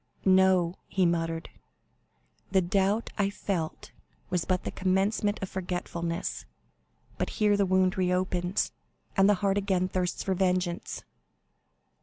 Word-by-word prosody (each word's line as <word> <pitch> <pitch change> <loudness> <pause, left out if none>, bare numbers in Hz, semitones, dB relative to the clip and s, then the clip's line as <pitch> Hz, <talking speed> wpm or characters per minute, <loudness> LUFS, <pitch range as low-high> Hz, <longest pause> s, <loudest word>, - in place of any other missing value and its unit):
"No," 185 -2 +4
he 190 -1 +1
muttered, 165 -1 -1 1.0
"the 190 - +5
doubt 195 +4 +1
I 200 -1 +3
felt 185 -5 -4 0.4
was 180 -2 0
but 185 -1 0
the - - -3
commencement 195 +2 +1
of 190 - -3
forgetfulness; 175 -1 -3 0.8
but - - 0
here 210 -2 +4
the 200 -1 +2
wound 185 0 +2
reopens, 180 0 0 0.4
and 195 0 +5
the 205 - +5
heart 195 0 +3
again 190 -2 +1
thirsts 180 -1 -2
for 190 - 0
vengeance. 180 -1 -1
185 Hz, 125 wpm, -28 LUFS, 180-195 Hz, 1.0 s, the